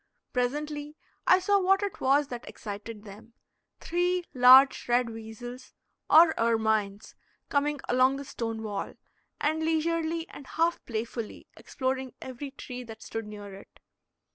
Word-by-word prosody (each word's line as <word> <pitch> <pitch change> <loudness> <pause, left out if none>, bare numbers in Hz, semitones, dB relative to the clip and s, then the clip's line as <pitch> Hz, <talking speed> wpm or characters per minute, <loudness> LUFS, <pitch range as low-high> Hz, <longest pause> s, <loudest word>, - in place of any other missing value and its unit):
Presently 295 +4 -2 0.3
I 370 - +7
saw 400 +2 +2
what 390 +2 +3
it 400 - -4
was 275 +2 +3
that 245 -1 -7
excited 210 +1 -8
them 215 +2 -13 0.5
three 355 +1 0
large 260 +1 +7
red 240 -1 +2
weasels, 235 +3 -9 0.3
or 320 0 +8
ermines 220 -3 0 0.4
coming 290 0 +1
along 255 +2 +3
the 280 +1 -6
stone 225 -4 -4
wall, 205 -2 -4 0.4
and 315 +2 0
leisurely 325 +1 0
and 275 - -11
half 335 +1 0
playfully 230 -1 -5
exploring 260 -2 -3
every 260 +2 -7
tree 250 -2 -8
that 225 -2 -11
stood 225 -1 -5
near 205 -1 -9
it. 195 - -14
255 Hz, 135 wpm, -28 LUFS, 225-305 Hz, 0.5 s, or